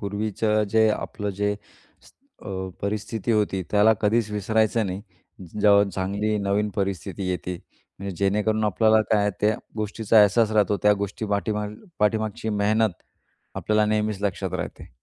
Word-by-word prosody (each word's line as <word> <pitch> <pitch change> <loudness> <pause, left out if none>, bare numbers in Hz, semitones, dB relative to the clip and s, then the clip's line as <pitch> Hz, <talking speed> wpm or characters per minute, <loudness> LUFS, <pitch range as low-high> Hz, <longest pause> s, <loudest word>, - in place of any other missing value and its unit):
पूर्वीचं 105 +1 0
जे 110 0 +4
आपलं 105 -1 -3
जे 105 0 +1 0.5
स - - -20 0.3
अ, 95 -2 -5
परिस्थिती 105 +2 -3
होती 105 -3 +1
त्याला 105 +2 +5
कधीच 110 +1 +1
विसरायचं 110 +1 +1
नाही. 95 +1 -4 0.6
जेव्हा 100 -1 +6
चांगली 100 +3 -1
नवीन 100 +1 0
परिस्थिती 95 -1 -3
येते 90 0 -3 0.4
म्हणजे 100 -1 -5
जेणेकरून 105 +3 +1
आपल्याला 110 +2 +3
काय 105 -2 +4
आहे 105 - +1
त्या 105 +1 +2 0.2
गोष्टीचा 110 0 +2
अहसास 110 +2 +4
राहतो 105 -1 +2
त्या 105 - +6
गोष्टी 100 +2 -4
पाठीमाग 105 0 -1 0.2
पाठीमागची 110 0 0
मेहनत 110 +1 +2 0.6
आपल्याला 105 0 +1
नेहमीच 105 -1 -1
लक्षात 100 -3 -2
राहते. - - -6
105 Hz, 140 wpm, -24 LUFS, 100-110 Hz, 0.6 s, जेव्हा